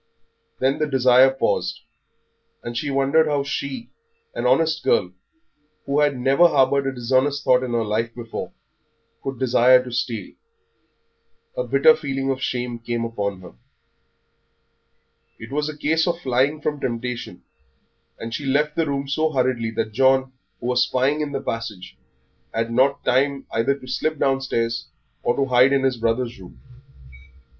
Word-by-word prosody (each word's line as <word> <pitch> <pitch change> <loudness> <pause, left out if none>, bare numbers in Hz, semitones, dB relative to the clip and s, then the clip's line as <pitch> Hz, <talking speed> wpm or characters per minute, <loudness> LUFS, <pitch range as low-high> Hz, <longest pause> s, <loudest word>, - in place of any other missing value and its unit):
Then 135 +2 0
the 155 - +1
desire 130 -1 +5
paused, 135 0 -1 0.8
and 120 0 -6
she 145 +5 -2
wondered 140 +4 +2
how 145 -2 0
she, 140 - -5 0.4
an - - -1
honest 160 -2 +2
girl, 90 - +2 0.7
who 140 +1 0
had 145 -2 +2
never 135 +7 +4
harboured 140 -2 +2
a - - 0
dishonest 130 +3 0
thought 125 0 +4
in 125 -2 -4
her 115 -1 +1
life 115 +2 -2
before, 115 -2 -6 0.7
could 135 -1 -5
desire 125 0 +4
to 125 - -9
steal; 120 -3 -3 1.2
a - - -1
bitter 475 -1 +5
feeling 135 - -2
of 130 -1 -4
shame 125 -2 -3
came 115 0 -3
upon 100 -4 -3
her. 90 - -12 1.8
It 115 +3 -11
was 150 +2 -1
a 150 - -8
case 160 +2 +1
of 170 -1 -1
flying 135 +2 0
from 150 0 -2
temptation, 120 -6 -4 0.7
and 115 0 -7
she 140 +3 -4
left 150 +3 +1
the 165 -1 0
room 140 -1 -2
so 155 +3 0
hurriedly 125 -4 0
that 110 -1 -2
John, 130 +1 +3 0.3
who - - -9
was 125 0 +2
spying 135 +4 +1
in 150 -1 -3
the 135 - -2
passage, 110 -5 -5 0.6
had 115 +1 -1
not 135 +4 +2
time 135 +2 +1
either 115 +5 +1
to 135 - -13
slip 155 +5 -1
downstairs 130 -4 -1 0.3
or 120 - 0
to 140 - +1
hide 130 +1 +4
in 135 -1 +2
his 130 -2 +1
brother's 115 +1 -1
room. 65 -10 -14
130 Hz, 155 wpm, -22 LUFS, 120-140 Hz, 1.8 s, desire